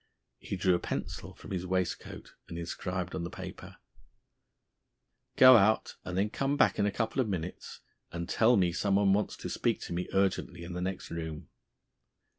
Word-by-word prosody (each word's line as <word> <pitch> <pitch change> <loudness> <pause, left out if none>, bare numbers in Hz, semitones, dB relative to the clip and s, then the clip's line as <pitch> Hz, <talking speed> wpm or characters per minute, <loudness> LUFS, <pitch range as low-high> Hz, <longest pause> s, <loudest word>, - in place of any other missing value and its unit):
He - - -5
drew 90 0 +2
a 90 - +2
pencil - - -5
from - - -12
his 90 -2 -2
waistcoat 95 -1 -3
and 85 - -7
inscribed 90 +2 -4
on 85 - -3
the 85 - -4
paper: - - -9 1.6
"Go 130 -1 +9
out, 110 +1 +2
and 90 0 -4
then 105 +2 +1
come 135 +3 0
back - - +3
in 100 - +3
a - - 0
couple 115 +5 0
of 115 - -1
minutes 90 -2 -5 0.3
and 85 0 -4
tell 115 +2 +4
me 90 -3 +3
someone 100 +2 +2
wants 105 +1 0
to - - -6
speak - - 0
to - - -5
me 90 +1 -3
urgently 95 -2 0
in 85 +1 -7
the 90 - -4
next 95 0 -4
room." 80 -2 -5
95 Hz, 180 wpm, -30 LUFS, 90-105 Hz, 1.6 s, Go